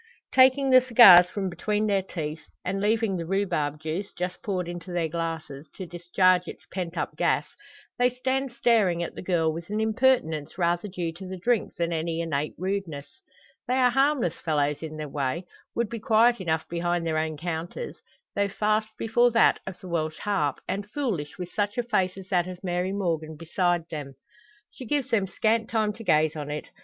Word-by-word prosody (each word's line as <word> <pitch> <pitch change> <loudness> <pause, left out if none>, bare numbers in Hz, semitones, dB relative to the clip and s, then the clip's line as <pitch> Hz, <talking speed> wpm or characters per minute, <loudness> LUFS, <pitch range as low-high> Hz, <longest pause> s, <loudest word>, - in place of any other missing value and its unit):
Taking 265 +1 +5
the 255 0 +8
cigars 210 -8 +8
from 195 0 -3
between 210 +4 -1
their 200 -2 +2
teeth 155 -4 -5 0.2
and 195 +2 -1
leaving 215 -2 +1
the 165 - -4
rhubarb 170 -6 -1
juice, 160 +6 -4
just 180 +1 -4
poured 185 -4 -2
into 175 +1 -7
their 175 -2 0
glasses, 160 -3 -5
to 190 - -6
discharge 180 +1 +2
its - - -9
pent 180 -2 -4
up - - -3
gas - - +1 0.5
they 245 0 +5
stand 260 +1 -2
staring 225 -8 +2
at - - -5
the - - -8
girl, 165 -4 +1
with 170 +3 -7
an 210 +1 -1
impertinence 220 - +1
rather 175 +2 +1
due 175 -4 -4
to 185 +3 -9
the 190 0 -6
drink 230 +4 0
than 170 0 -1
any 165 0 -2
innate 150 -3 -2
rudeness. 190 - -4 0.5
They 250 - +1
are 250 -1 +4
harmless 270 - +1
fellows 150 -2 0
in 155 -1 -6
their 155 -1 -4
way; 140 +4 -2 0.3
would 235 -1 0
be 230 +2 -6
quiet 225 +1 +3
enough 160 -3 -1
behind 175 0 -1
their 160 -1 0
own 155 -1 -2
counters; 170 - -5 0.4
though 200 0 +1
fast 215 +2 +1
before 240 +2 +3
that 230 -1 +4
of 190 - -7
the 185 - -9
"Welsh 155 -3 -2
Harp," 170 -10 -1
and 200 +1 -3
foolish 210 - -3
with 180 -1 -6
such 205 0 -1
a 245 - +1
face 190 -5 0
as 190 -1 -9
that 180 -3 +2
of 180 0 -8
Mary 180 0 -1
Morgan 165 -5 -2
beside 175 +1 0
them. 145 -4 -6 0.6
She - - -10
gives 275 -2 -1
them 205 -4 +2
scant 220 +3 0
time 215 -2 +1
to 225 +2 -10
gaze 155 -5 +3
on 150 -1 -5
it. 150 +1 -5
180 Hz, 190 wpm, -26 LUFS, 165-215 Hz, 0.6 s, the